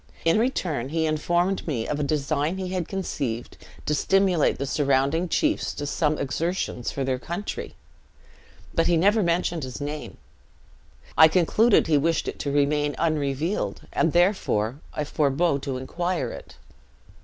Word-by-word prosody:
In 165 Hz, +5 st, +4 dB
return, 170 Hz, -, -1 dB
he 160 Hz, +1 st, 0 dB
informed 175 Hz, +5 st, 0 dB
me 120 Hz, -8 st, -2 dB
of 150 Hz, -, -2 dB
a -, -, 0 dB
design 150 Hz, +3 st, 0 dB
he 185 Hz, -1 st, -4 dB
had 180 Hz, -3 st, -2 dB
conceived, 135 Hz, -, -3 dB, 0.3 s
to 150 Hz, -, +1 dB
stimulate 190 Hz, 0 st, +2 dB
the 140 Hz, -, -2 dB
surrounding 140 Hz, +4 st, +1 dB
chiefs 310 Hz, -, 0 dB
to 145 Hz, -, -4 dB
some 150 Hz, +1 st, 0 dB
exertions 140 Hz, -2 st, -2 dB
for 140 Hz, -, -3 dB
their 130 Hz, -1 st, -1 dB
country; 175 Hz, +9 st, -5 dB, 1.0 s
but 165 Hz, -, +2 dB
as -, -, +2 dB
he 175 Hz, -, +3 dB
never 205 Hz, +6 st, +4 dB
mentioned 170 Hz, -2 st, 0 dB
his 130 Hz, -1 st, -6 dB
name, 145 Hz, +1 st, -5 dB, 1.0 s
I 160 Hz, -, +9 dB
concluded 190 Hz, +7 st, +3 dB
he 150 Hz, -3 st, +3 dB
wished 165 Hz, +3 st, 0 dB
it -, -, -5 dB
to 140 Hz, -, -2 dB
remain 145 Hz, +1 st, +1 dB
unrevealed, 155 Hz, +2 st, -1 dB
and 165 Hz, -, +2 dB
therefore 160 Hz, -, +1 dB
I 150 Hz, -, -3 dB
forbore 145 Hz, +1 st, +1 dB
to 135 Hz, -2 st, -3 dB
inquire 170 Hz, 0 st, -2 dB
it. -, -, -10 dB
155 Hz, 155 wpm, -25 LUFS, 140-175 Hz, 1.0 s, I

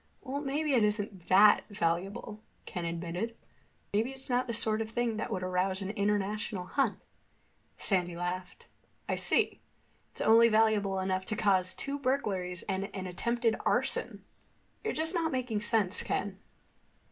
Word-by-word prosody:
"Well, 280 Hz, +1 st, -3 dB
maybe 295 Hz, +1 st, 0 dB
it 240 Hz, -4 st, +4 dB
isn't 205 Hz, -3 st, 0 dB
that 205 Hz, +2 st, +7 dB
valuable," 195 Hz, +3 st, -2 dB, 0.2 s
Ken 175 Hz, -4 st, -4 dB
admitted. 175 Hz, +7 st, -3 dB, 0.6 s
"Maybe 220 Hz, +4 st, +2 dB
it's 265 Hz, -1 st, -7 dB
not 250 Hz, +1 st, +1 dB
the 235 Hz, -, -2 dB
sort 215 Hz, 0 st, +1 dB
of 220 Hz, -, -3 dB
thing 235 Hz, -1 st, -1 dB
that -, -, -3 dB
would 185 Hz, -, -2 dB
arouse 185 Hz, +1 st, 0 dB
an 195 Hz, -, -3 dB
international 205 Hz, -1 st, -1 dB
hunt." 255 Hz, +2 st, 0 dB, 0.8 s
Sandy 180 Hz, -3 st, 0 dB
laughed. 180 Hz, +1 st, -5 dB, 0.4 s
"I -, -, 0 dB
see. -, -, +1 dB, 0.5 s
It's -, -, -11 dB
only 230 Hz, +1 st, +6 dB
valuable 215 Hz, -3 st, +3 dB
enough 185 Hz, 0 st, -1 dB
to 215 Hz, -, 0 dB
cause 190 Hz, -3 st, +2 dB
two 280 Hz, +1 st, -2 dB
burglaries 195 Hz, -10 st, -1 dB
and 195 Hz, +1 st, -2 dB
an 190 Hz, -1 st, -4 dB
attempted 230 Hz, +5 st, 0 dB
arson. -, -, 0 dB, 0.6 s
You're 440 Hz, -, 0 dB
just 320 Hz, +3 st, 0 dB
not 330 Hz, -3 st, 0 dB
making 250 Hz, -5 st, -1 dB
sense, 210 Hz, -3 st, +2 dB
Ken." 195 Hz, -1 st, -2 dB
210 Hz, 150 wpm, -31 LUFS, 185-235 Hz, 0.8 s, that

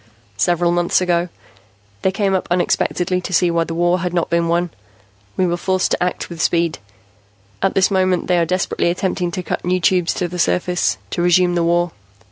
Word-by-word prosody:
"Several 175 Hz, -, +2 dB
months 175 Hz, 0 st, +2 dB
ago, 175 Hz, -1 st, 0 dB, 0.7 s
they 190 Hz, -, +1 dB
came 195 Hz, 0 st, 0 dB
up 190 Hz, -, -1 dB
unexpectedly 180 Hz, 0 st, 0 dB
to 185 Hz, -, -6 dB
see 175 Hz, 0 st, +3 dB
why 165 Hz, 0 st, +1 dB
the 165 Hz, -, -5 dB
war 175 Hz, +2 st, +2 dB
had 180 Hz, 0 st, -3 dB
not 170 Hz, -, -1 dB
been 170 Hz, 0 st, +2 dB
won. 170 Hz, 0 st, 0 dB, 0.7 s
We 185 Hz, -, +2 dB
were 175 Hz, -1 st, 0 dB
forced 185 Hz, +1 st, 0 dB
to -, -, 0 dB
act 180 Hz, 0 st, -1 dB
with 170 Hz, -1 st, -7 dB
speed. 170 Hz, -1 st, +1 dB, 0.8 s
At 195 Hz, -, +1 dB
this 190 Hz, +1 st, +3 dB
moment 185 Hz, -2 st, +1 dB
they 180 Hz, -1 st, +2 dB
are 170 Hz, -, +2 dB
desperately 180 Hz, -1 st, 0 dB
attempting 180 Hz, 0 st, -1 dB
to 185 Hz, +1 st, -5 dB
cut -, -, -3 dB
new 185 Hz, +1 st, +1 dB
Tubes 180 Hz, 0 st, +2 dB
to 180 Hz, -, -1 dB
the 180 Hz, +1 st, -7 dB
surface, 180 Hz, +1 st, +1 dB
to -, -, -2 dB
resume 175 Hz, 0 st, +3 dB
the 175 Hz, -, +1 dB
war. 175 Hz, 0 st, +1 dB
175 Hz, 200 wpm, -19 LUFS, 170-185 Hz, 0.8 s, see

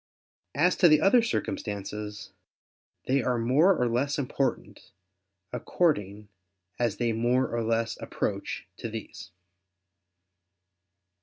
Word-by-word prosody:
As 175 Hz, +6 st, +3 dB
to 180 Hz, -, +6 dB
the 155 Hz, -2 st, +6 dB
other 195 Hz, +9 st, +5 dB
circumstances, 105 Hz, -, -4 dB, 0.7 s
they 135 Hz, +1 st, +2 dB
are 125 Hz, 0 st, 0 dB
more 145 Hz, +11 st, +4 dB
or 125 Hz, -, +2 dB
less 130 Hz, +5 st, 0 dB
important, 135 Hz, -1 st, -3 dB, 0.6 s
according 105 Hz, -, -1 dB, 0.5 s
as 115 Hz, -4 st, 0 dB
they 120 Hz, -2 st, 0 dB
more 120 Hz, +3 st, +1 dB
or 120 Hz, 0 st, -2 dB
less 115 Hz, 0 st, 0 dB
approach -, -, -3 dB
to -, -, -5 dB
these. -, -, -8 dB
120 Hz, 105 wpm, -27 LUFS, 110-145 Hz, 0.7 s, to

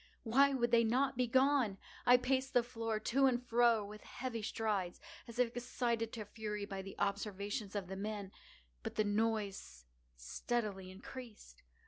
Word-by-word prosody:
Why 275 Hz, +5 st, +5 dB
would 240 Hz, -2 st, +1 dB
they 235 Hz, -1 st, +6 dB
not 255 Hz, +5 st, +2 dB
be 250 Hz, 0 st, +1 dB
gone? 260 Hz, -4 st, +3 dB, 0.3 s
I 245 Hz, 0 st, +9 dB
paced 260 Hz, +1 st, 0 dB
the 245 Hz, -, +6 dB
floor 225 Hz, -2 st, -2 dB
to 270 Hz, +5 st, +3 dB
and 245 Hz, -2 st, +2 dB
fro 235 Hz, -3 st, +3 dB
with 210 Hz, +1 st, -9 dB
heavy 245 Hz, -3 st, -5 dB
strides, 210 Hz, -4 st, -1 dB, 0.3 s
as 235 Hz, 0 st, -9 dB
if 245 Hz, -2 st, +2 dB
excited 235 Hz, -2 st, -1 dB
to 220 Hz, -3 st, -5 dB
fury 210 Hz, -1 st, -4 dB
by 195 Hz, -1 st, -5 dB
the 195 Hz, 0 st, -9 dB
observations 200 Hz, +1 st, -2 dB
of 200 Hz, -2 st, -1 dB
the 190 Hz, -, -5 dB
men—but 190 Hz, -, -7 dB
the 215 Hz, -, +3 dB
noise 205 Hz, -, -1 dB, 0.3 s
steadily 190 Hz, -, -3 dB
increased. 205 Hz, -, -10 dB
225 Hz, 155 wpm, -36 LUFS, 200-245 Hz, 0.3 s, I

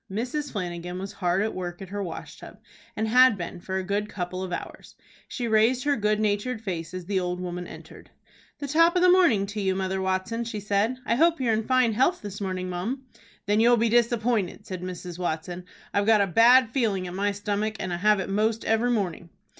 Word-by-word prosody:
Mrs. 255 Hz, +8 st, -3 dB
Flanagan 180 Hz, -2 st, -4 dB
was 195 Hz, +1 st, -6 dB
hard 180 Hz, +1 st, 0 dB
at 220 Hz, -, -2 dB
work 175 Hz, -1 st, -5 dB
at 190 Hz, -, -9 dB
her 205 Hz, +1 st, -4 dB
wash 170 Hz, -4 st, -7 dB
tub, -, -, -12 dB, 0.4 s
and 220 Hz, +1 st, 0 dB
had 250 Hz, -1 st, +6 dB
been 175 Hz, 0 st, -6 dB
for 190 Hz, +1 st, -3 dB
a 190 Hz, -, -2 dB
good 205 Hz, +2 st, -2 dB
couple 185 Hz, 0 st, -4 dB
of 185 Hz, -1 st, -5 dB
hours. -, -, -7 dB, 0.3 s
She 245 Hz, -2 st, -4 dB
raised 225 Hz, +3 st, +3 dB
her 290 Hz, -1 st, +2 dB
good 210 Hz, -2 st, +1 dB
natured 215 Hz, +3 st, 0 dB
face 175 Hz, -4 st, -4 dB
as 180 Hz, -1 st, -6 dB
the 195 Hz, +1 st, 0 dB
old 180 Hz, 0 st, -3 dB
woman 180 Hz, 0 st, -5 dB
entered. -, -, -12 dB, 0.5 s
"The 285 Hz, -, -5 dB
top 330 Hz, +5 st, +4 dB
of 360 Hz, -, +3 dB
the 365 Hz, -, +7 dB
morning 335 Hz, -, +4 dB
to 205 Hz, +1 st, -5 dB
you, 190 Hz, -1 st, 0 dB
Mother 190 Hz, 0 st, -2 dB
Watson," 190 Hz, +5 st, -1 dB
she 225 Hz, -2 st, -5 dB
said. 205 Hz, +4 st, 0 dB
"I 230 Hz, -, +1 dB
hope 330 Hz, +6 st, +3 dB
you're 240 Hz, -4 st, +1 dB
in 220 Hz, 0 st, -1 dB
fine 255 Hz, -3 st, +3 dB
health 265 Hz, +9 st, +1 dB
this 205 Hz, 0 st, -7 dB
morning, 185 Hz, -1 st, -3 dB
mum." 200 Hz, +10 st, -4 dB, 0.4 s
"Then 205 Hz, +1 st, +2 dB
you'll 240 Hz, +1 st, +5 dB
be 230 Hz, 0 st, +2 dB
disappointed," 230 Hz, -4 st, +1 dB
said 185 Hz, -3 st, -6 dB
Mrs. 180 Hz, -1 st, -7 dB
Watson. 175 Hz, +1 st, -3 dB, 0.3 s
"I've 200 Hz, +1 st, +1 dB
got 220 Hz, -2 st, +5 dB
a -, -, +4 dB
bad 230 Hz, +5 st, +5 dB
feeling 215 Hz, -8 st, 0 dB
at 175 Hz, -, -6 dB
my 200 Hz, +2 st, 0 dB
stomach, 205 Hz, +1 st, -2 dB
and 185 Hz, -, -3 dB
have 210 Hz, +4 st, +3 dB
it -, -, -3 dB
most 215 Hz, +3 st, 0 dB
every 225 Hz, +2 st, +2 dB
morning." 185 Hz, -7 st, -2 dB
205 Hz, 215 wpm, -26 LUFS, 185-235 Hz, 0.5 s, the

